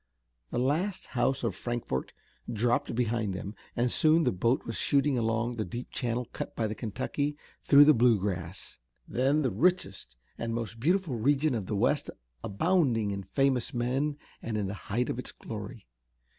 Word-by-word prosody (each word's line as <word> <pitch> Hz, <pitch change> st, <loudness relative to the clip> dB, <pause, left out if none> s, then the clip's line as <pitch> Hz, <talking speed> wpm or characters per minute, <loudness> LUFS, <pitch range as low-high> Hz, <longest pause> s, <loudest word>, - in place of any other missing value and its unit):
The -, -, -3 dB
last 155 Hz, +10 st, 0 dB
house 125 Hz, +1 st, +1 dB
of 115 Hz, -4 st, 0 dB
Frankfort 120 Hz, -, -3 dB, 0.4 s
dropped 120 Hz, +1 st, +1 dB
behind 115 Hz, -4 st, 0 dB
them, 100 Hz, +2 st, -5 dB, 0.2 s
and 120 Hz, +1 st, +1 dB
soon 160 Hz, +1 st, +4 dB
the 125 Hz, -, +2 dB
boat 115 Hz, +8 st, +1 dB
was 115 Hz, -, -4 dB
shooting 140 Hz, 0 st, +2 dB
along 115 Hz, 0 st, 0 dB
the 110 Hz, -, 0 dB
deep 120 Hz, +7 st, -6 dB
channel 120 Hz, -1 st, -2 dB
cut -, -, -5 dB
by 115 Hz, -, 0 dB
the 110 Hz, -, -2 dB
Kentucky 130 Hz, +7 st, -3 dB, 0.3 s
through 145 Hz, 0 st, +8 dB
the 155 Hz, -, +7 dB
Bluegrass, 100 Hz, -, 0 dB, 0.3 s
then 135 Hz, +5 st, +2 dB
the 130 Hz, -, +1 dB
richest 100 Hz, -, 0 dB, 0.2 s
and 115 Hz, 0 st, -2 dB
most 115 Hz, -1 st, -4 dB
beautiful 175 Hz, +3 st, +1 dB
region 145 Hz, +4 st, +2 dB
of 105 Hz, -6 st, -3 dB
the 105 Hz, -, -1 dB
west, 100 Hz, -, +1 dB, 0.3 s
abounding 120 Hz, -, +1 dB
in 100 Hz, 0 st, -3 dB
famous 125 Hz, +6 st, 0 dB
men 135 Hz, +5 st, 0 dB, 0.2 s
and 110 Hz, -1 st, -3 dB
in 105 Hz, -, 0 dB
the 95 Hz, -, -3 dB, 0.2 s
height 120 Hz, +5 st, +1 dB
of -, -, -3 dB
its -, -, -5 dB
glory. -, -, -8 dB
120 Hz, 170 wpm, -29 LUFS, 110-140 Hz, 0.4 s, through